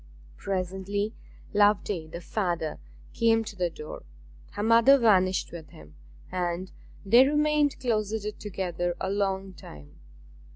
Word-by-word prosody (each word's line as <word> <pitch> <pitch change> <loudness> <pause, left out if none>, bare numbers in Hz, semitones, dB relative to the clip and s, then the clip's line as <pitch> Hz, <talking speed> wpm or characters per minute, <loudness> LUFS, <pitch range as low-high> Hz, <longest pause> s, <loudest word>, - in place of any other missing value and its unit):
Presently 195 +3 -3 0.4
Loveday, 205 -4 +2
the 170 +2 -8
father, 175 -5 -2 0.3
came 225 -1 +3
to 215 - -8
the 180 -2 0
door; 155 -2 -9 0.5
her 205 0 -3
mother 230 +5 +6
vanished 190 -6 +3
with 165 -4 -9
him, 75 -1 -15 0.4
and 180 0 -2 0.3
they 240 +6 +6
remained 300 0 +2
closeted 215 -3 -2
together 175 -3 -3
a 190 - -2
long 195 -1 -1
time. 75 - -13
195 Hz, 120 wpm, -27 LUFS, 175-220 Hz, 0.5 s, mother